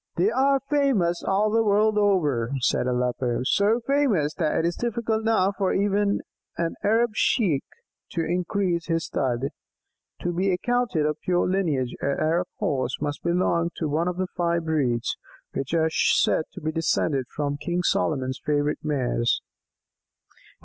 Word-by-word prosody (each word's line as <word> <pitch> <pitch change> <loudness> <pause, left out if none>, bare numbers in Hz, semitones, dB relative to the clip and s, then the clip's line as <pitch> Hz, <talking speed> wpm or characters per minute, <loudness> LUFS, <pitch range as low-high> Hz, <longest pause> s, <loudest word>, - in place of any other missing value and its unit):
"They 190 +5 +2
are 270 +3 +3
famous 260 - +1
all 205 +2 +1
the 225 +1 +3
world 210 +1 +3
over," 160 - +2
said 125 - +1
Aleppo; 125 -1 0
"so 205 - +2
famous 235 - +2
that 155 -1 0
it 165 - +1
is 170 0 0
difficult 230 -2 -1
now 215 -4 +2
for 190 -2 0
even 200 +1 +1 0.4
an 165 0 -1
Arab 225 +3 +3
Sheik 190 - +2 0.5
to 165 -1 -2
increase 180 0 -1
his 165 -1 0
stud. 130 0 -1 0.7
To 175 - -1
be 190 +3 +1
accounted 225 -4 0
of 150 0 -2
pure 180 -1 +1
lineage, 160 -10 0
an 140 0 0
Arab 170 +3 +1
Horse 130 -2 -1
must 145 0 -3
belong 170 -1 +1
to 160 - -2
one 155 +4 0
of 180 0 -2
the 185 - 0
five 170 -1 0
breeds 130 -7 0 0.4
which 135 - -3
are 160 -1 +2
said 155 - +2
to - - -9
be 155 0 -1
descended 155 -4 0
from 145 0 -3
King 175 +3 -2
Solomon's 130 -6 0
favourite 150 0 0
mares! 130 -5 0
170 Hz, 155 wpm, -25 LUFS, 150-200 Hz, 0.7 s, are